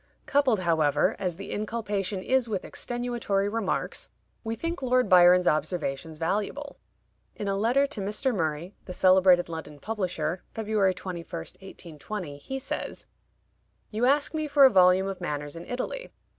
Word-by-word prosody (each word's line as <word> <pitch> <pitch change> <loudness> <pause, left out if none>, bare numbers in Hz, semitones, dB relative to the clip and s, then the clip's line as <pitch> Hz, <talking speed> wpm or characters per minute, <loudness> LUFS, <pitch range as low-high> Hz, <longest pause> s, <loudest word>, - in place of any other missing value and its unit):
Coupled, 265 -8 +2
however, 160 -4 +2
as 180 -3 -2
the 195 +3 -8
inculpation 205 -3 -2
is 255 0 +1
with 200 -4 -2
extenuatory 240 -5 -2
remarks, 225 -4 -2 0.3
we 225 0 -3
think 335 +7 -4
Lord 255 -2 +2
Byron's 180 -1 +6
observations 155 -1 -1
valuable. 210 - -3 0.6
In 205 - -5
a 195 - 0
letter 240 +7 +3
to 280 -7 -5
Mr. 215 +7 0
Murray, 165 0 -2
the 180 - -6
celebrated 185 -1 +5
London 160 -3 -7
publisher 180 -5 -2
(February 210 -4 +1
21, 180 -2 -6
1820), 170 -1 -7
he 265 - -5
says: 270 +1 -5 0.9
"You 225 +3 0
ask 285 +3 +2
me 310 -1 -1
for 285 -1 +6
a 265 - +7
volume 185 -1 +5
of 195 -1 -5
manners 145 0 -4
in 170 - -9
Italy. - - -4
195 Hz, 145 wpm, -27 LUFS, 175-240 Hz, 0.9 s, a